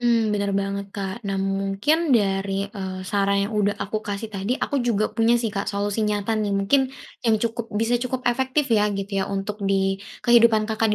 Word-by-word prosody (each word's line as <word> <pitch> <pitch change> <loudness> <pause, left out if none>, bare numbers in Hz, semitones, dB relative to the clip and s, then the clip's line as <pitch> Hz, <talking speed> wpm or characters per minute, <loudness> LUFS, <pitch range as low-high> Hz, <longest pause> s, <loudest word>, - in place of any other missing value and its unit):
Mmm, 230 -3 +2
bener 200 -1 0
banget, 200 0 -2
Kak. 195 +3 -4
Nah 195 - -1
mungkin 195 - 0
dari, 195 -1 0
eee, 190 -2 -5
saran 200 0 +1
yang 210 - -5
udah 205 -1 +1
aku 215 +2 -3
kasih 210 +1 -5
tadi 200 +6 -1
aku 280 - -1
juga 220 -3 0
punya 230 +1 +3
sih, 230 -3 -2
Kak, 200 -1 -2
solusi 205 +1 -1
nyata 210 +1 -1
nih 205 -2 0
mungkin 260 +7 +2 0.3
yang 225 -2 +3
cukup 230 +1 -3
bisa 230 +2 +1
cukup 255 +1 -3
efektif 260 +4 +1
ya 210 -1 +4
gitu 195 0 -2
ya - - -2
untuk 200 +2 -4
di 195 0 +1 0.2
kehidupan 235 -2 +5
Kakak 220 0 0
210 Hz, 190 wpm, -23 LUFS, 195-230 Hz, 0.3 s, kehidupan